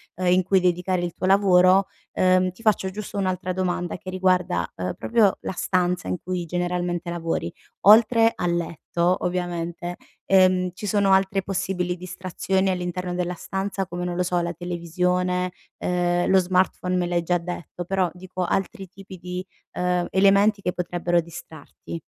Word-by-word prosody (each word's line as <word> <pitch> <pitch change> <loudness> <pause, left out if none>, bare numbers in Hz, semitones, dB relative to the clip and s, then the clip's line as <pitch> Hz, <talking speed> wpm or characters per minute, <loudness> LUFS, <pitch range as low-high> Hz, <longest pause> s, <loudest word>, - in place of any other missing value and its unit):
ehm, 185 +1 -2
in 185 - +4
cui 190 +1 +3
dedicare 180 0 0
il 175 -1 -3
tuo 185 - -3
lavoro, 190 -1 +5 0.3
ehm, 185 0 +3
ti 185 - -18
faccio 210 -4 +2
giusto 205 +1 -7
un'altra 185 -1 -1
domanda 180 -1 -2
che 185 - -8
riguarda, 185 - +1
ehm, 90 0 -3
proprio 225 -4 +2
la - - -4
stanza 180 0 0
in - - -1
cui 180 -1 -3
generalmente 175 0 -2
lavori. 165 - -2 0.4
Oltre 225 +1 +7
al 175 -1 0
letto, 170 +1 -1
ovviamente, 175 -1 -3 0.3
ehm, 185 -1 +4
ci 205 +3 -6
sono 200 -1 +2
altre 195 +1 +2
possibili 180 -2 -2
distrazioni 185 +1 -2
all'interno 180 0 -3
della 180 0 -2
stanza, 195 +2 -3
come, 175 -1 -5
non 175 0 -3
lo 180 - +1
so, 180 0 0
la 170 0 -3
televisione? 180 +1 -1 0.3
Ehm, 175 0 0
lo 190 - +6
smartphone 185 0 +1
me 180 -1 +1
l'hai 175 0 0
già 175 +1 +1
detto, 175 0 -6
però, 190 0 +1
dico, 185 0 -5
altri 195 +1 -2
tipi 195 0 -12
di, 180 +1 -6 0.3
ehm, 180 -1 0
elementi 200 +2 +4
che 180 - -1
potrebbero 175 0 0
distrarti. 165 0 -10
180 Hz, 160 wpm, -24 LUFS, 175-190 Hz, 0.4 s, Oltre